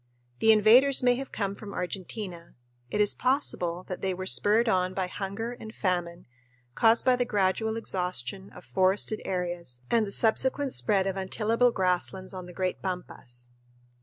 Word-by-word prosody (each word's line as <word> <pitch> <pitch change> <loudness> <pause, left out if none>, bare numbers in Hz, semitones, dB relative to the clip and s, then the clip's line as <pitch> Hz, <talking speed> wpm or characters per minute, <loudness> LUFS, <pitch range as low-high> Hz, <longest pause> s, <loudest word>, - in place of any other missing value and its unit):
The 220 - +5
invaders 240 +6 +5
may 245 0 +5
have 270 +1 -6
come 200 -2 -2
from 200 0 -9
Argentina. 180 -1 -6 0.3
It 210 - -2
is 205 -1 +5
possible 185 -10 0
that 185 - -6
they 190 -1 -1
were 185 +1 -5
spurred 215 +4 +3
on 185 -3 +1
by 190 - 0
hunger 200 +5 -5
and 220 -2 -10
famine 175 -2 -2 0.5
caused 225 - +4
by 255 -1 +5
the 250 - +1
gradual 220 0 0
exhaustion 185 - -4
of - - -12
forested 190 +3 +1
areas 175 -9 -3
and 225 -2 +3
the - - -7
subsequent 260 +6 +1
spread 200 -3 +1
of 195 0 -2
untillable 225 +5 +1
grasslands 185 0 -1
on 185 -1 -7
the - - -9
great 185 +1 -2
pampas. 120 -10 -7
195 Hz, 165 wpm, -27 LUFS, 180-225 Hz, 0.5 s, The